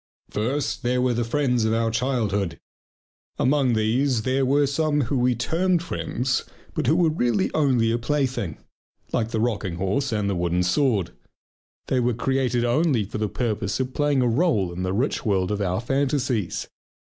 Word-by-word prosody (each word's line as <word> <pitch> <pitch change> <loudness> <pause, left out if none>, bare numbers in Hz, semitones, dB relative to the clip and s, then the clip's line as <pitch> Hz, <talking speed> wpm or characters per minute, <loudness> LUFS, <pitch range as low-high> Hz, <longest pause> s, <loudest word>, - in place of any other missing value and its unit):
First, 130 +8 -1
there 125 0 +1
were 125 -1 +2
the 120 0 0
friends 125 -1 +1
of 110 0 +1
our 115 0 +1
childhood! 110 -8 -1 0.8
Among 135 -2 +2
these 115 +3 +1
there 130 +2 +1
were 145 +2 +3
some 150 +1 +1
whom 130 +1 0
we 125 0 +2
termed 170 +8 +1
friends 130 -6 -2 0.3
but - - -2
who 155 - +4
were 170 -2 +3
really 120 - +1
only 130 -7 +2
a 120 - 0
plaything, 125 - -1 0.6
like 110 -1 0
the 115 - -2
rocking 105 -6 -1
horse 100 +10 -1
and 105 -2 0
the 100 - 0
wooden 90 +1 0
sword. 100 - +1 0.7
They 130 - +1
were 125 -1 +1
created 125 -1 0
only 130 -1 +2
for 105 +2 -6
the 105 -1 -1
purpose 110 -3 -2
of 130 0 -2
playing 145 -2 +2
a - - +2
role 115 - +1
in 90 - -5
the 95 0 -1
rich 120 +9 -1
world 95 -3 +1
of 105 0 -1
our 95 -1 0
fantasies. 130 - -1
120 Hz, 175 wpm, -24 LUFS, 105-135 Hz, 0.8 s, who